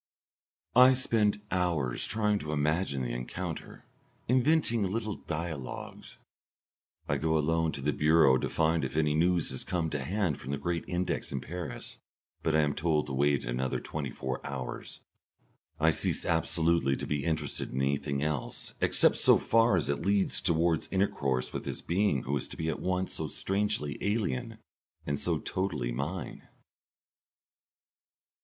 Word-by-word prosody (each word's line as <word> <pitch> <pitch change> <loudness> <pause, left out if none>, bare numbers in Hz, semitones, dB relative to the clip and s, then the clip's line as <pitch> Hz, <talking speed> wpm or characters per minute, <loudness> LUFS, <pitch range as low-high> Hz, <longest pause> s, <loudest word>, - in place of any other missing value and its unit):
I 125 +1 +8
spend 105 -5 +1
hours 85 -9 0
trying 105 -1 +1
to 75 -3 -4
imagine 75 -2 0
the - - -3
encounter, 80 +8 -6 0.4
inventing 130 -1 +3
little 105 +2 -1
dialogues. 75 -5 -6 0.9
I - - +1
go 80 0 +1
alone 80 +1 +1
to 70 - -5
the 75 +2 0
Bureau 75 -4 +5
to - - -2
find 80 -1 +1
if 65 +3 -3
any 75 -1 +2
news 85 +2 +2
has 65 - -5
come 85 -3 -1
to 70 -2 -2
hand 90 -1 -1
from - - -9
the 70 - -1
Great 85 +4 -2
Index 90 0 -2
in 70 - -2
Paris, 85 +1 -7 0.4
but 80 - +1
I 80 - +5
am 75 -1 +1
told 75 -1 +1
to 70 - -6
wait 70 +1 +2
another 60 +2 -1
twenty 75 -3 -4
four 65 +1 -4
hours. 65 -3 -6 0.8
I 80 +1 +5
cease - - -1
absolutely 80 -3 +2
to - - -4
be 75 -2 -1
interested 80 -3 -2
in 65 - -2
anything 70 +1 0
else, 75 -4 -3
except - - +4
so - - +6
far 115 -2 +3
as 80 - 0
it 70 +3 -1
leads 100 +1 +1
towards 85 -2 +1
intercourse 70 -10 0
with - - -3
this - - -4
being 85 -7 +1
who 70 +3 -1
is - - -3
to - - -10
be 80 0 -1
at 80 - -2
once 95 0 -1
so - - -2
strangely 100 -6 -1
alien 100 - -1 0.5
and 70 -1 -1
so - - +1
totally 80 -11 -2
mine. 75 +7 -5
80 Hz, 160 wpm, -30 LUFS, 70-95 Hz, 0.9 s, I